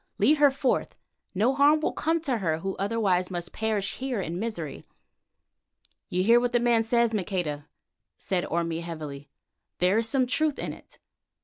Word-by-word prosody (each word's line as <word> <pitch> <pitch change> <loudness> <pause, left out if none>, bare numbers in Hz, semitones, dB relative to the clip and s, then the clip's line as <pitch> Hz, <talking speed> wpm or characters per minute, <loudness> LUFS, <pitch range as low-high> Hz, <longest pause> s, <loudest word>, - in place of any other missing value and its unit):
Lead 305 - +4
her 290 -1 +7
forth. 270 -1 -1 0.4
No 225 +8 +3
harm 290 +3 +5
will 305 - -1
come 325 +2 0
to 265 -7 -1
her 160 -5 0
who 195 +4 -4
otherwise 195 -3 +1
must 175 -1 -5
perish 215 -3 -2
here 260 -4 -2
in 175 -1 -3
misery." 190 -10 -5 1.3
"You 180 +1 0
hear 230 +4 +6
what 245 0 -1
the 240 - +4
man 235 -1 +3
says, 235 0 +2
Maqueda?" 175 -7 -2 0.5
said 180 -2 -1
Orme 165 0 -1
heavily. 150 -4 -7 0.5
"There 185 +5 +3
is 230 0 -1
some 260 +1 +2
truth 295 +4 0
in - - -4
it. - - -15
215 Hz, 170 wpm, -27 LUFS, 175-245 Hz, 1.3 s, her